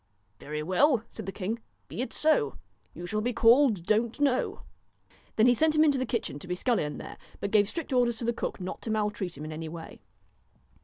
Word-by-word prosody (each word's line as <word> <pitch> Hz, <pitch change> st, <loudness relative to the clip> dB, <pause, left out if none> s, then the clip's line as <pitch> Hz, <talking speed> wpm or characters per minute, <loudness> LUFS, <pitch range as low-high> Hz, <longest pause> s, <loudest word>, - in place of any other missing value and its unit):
' 100 Hz, +1 st, -42 dB
Very 150 Hz, +1 st, -5 dB
well,' 225 Hz, -, +3 dB
said 220 Hz, -4 st, -8 dB
the -, -, -2 dB
king, 210 Hz, +4 st, -3 dB, 0.2 s
' -, -, -43 dB
be -, -, -5 dB
it 260 Hz, -, -3 dB
so. 305 Hz, -, +2 dB, 0.4 s
You 175 Hz, -, -7 dB
shall 215 Hz, +4 st, -1 dB
be 245 Hz, +3 st, -1 dB
called 230 Hz, -5 st, +4 dB
Don't 225 Hz, +5 st, +1 dB
know.' 275 Hz, -3 st, +1 dB, 0.7 s
Then 220 Hz, -, +4 dB
he 245 Hz, -, +6 dB
sent 310 Hz, +5 st, +2 dB
him 305 Hz, -, +6 dB
into 285 Hz, -4 st, +3 dB
the 255 Hz, -, -1 dB
kitchen 225 Hz, -, -2 dB
to 185 Hz, -, -8 dB
be 180 Hz, -, -2 dB
scullion 180 Hz, -, 0 dB
there, -, -, -9 dB, 0.2 s
but 200 Hz, -, -3 dB
gave 205 Hz, -2 st, +4 dB
strict 330 Hz, -5 st, -5 dB
orders 245 Hz, -2 st, +3 dB
to 230 Hz, -, -5 dB
the 235 Hz, -, +1 dB
cook -, -, -4 dB
not 185 Hz, 0 st, -6 dB
to -, -, -6 dB
maltreat 210 Hz, -6 st, -2 dB
him 150 Hz, -, -6 dB
in 155 Hz, -, -6 dB
any 160 Hz, +1 st, -5 dB
way. 165 Hz, 0 st, -9 dB
220 Hz, 225 wpm, -28 LUFS, 180-250 Hz, 0.7 s, he